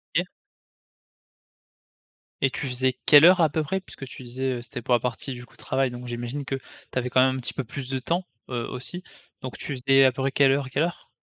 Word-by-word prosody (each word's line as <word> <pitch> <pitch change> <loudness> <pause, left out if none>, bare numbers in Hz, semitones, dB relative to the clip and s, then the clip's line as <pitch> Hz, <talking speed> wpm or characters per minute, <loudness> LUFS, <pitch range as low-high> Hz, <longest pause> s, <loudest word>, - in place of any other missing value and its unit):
OK. - - +2 2.1
Et 135 - +4
tu 140 - -4
faisais 130 0 +1
quelle 150 +1 +9
heure 180 0 +7
à 160 - +5
peu 155 +2 -1
près 190 +6 -2
puisque, 135 - -10
tu 130 - -10
disais, 130 +2 -2
heu, - - -6
c'était 120 0 -7
pour 125 - 0
la 120 - +5
partie, 125 +3 -3
du 125 0 -9
coup, - - -25
de - - -19
travail. 130 -1 0
Donc, 120 0 -8
j'imagine 120 +4 -4
que 135 - -2
tu 135 - -10
avais 125 0 0
quand 130 - +4
même 130 0 +1
un - - -3
petit 125 - -3
peu 135 - -3
plus 130 +3 -6
de 130 -1 -1
temps, 170 +7 -1 0.2
heu, 120 -2 -2
aussi. 155 +8 -4 0.4
Donc, 130 - -6
tu 145 - -5
faisais 135 +2 +5
à 130 - +5
peu 130 +2 -5
près 135 0 +1
quelle 135 0 +4
heure 140 0 +1
à - - -8
quelle 140 +4 +1
heure? 170 +1 -4
130 Hz, 250 wpm, -25 LUFS, 125-140 Hz, 2.1 s, quelle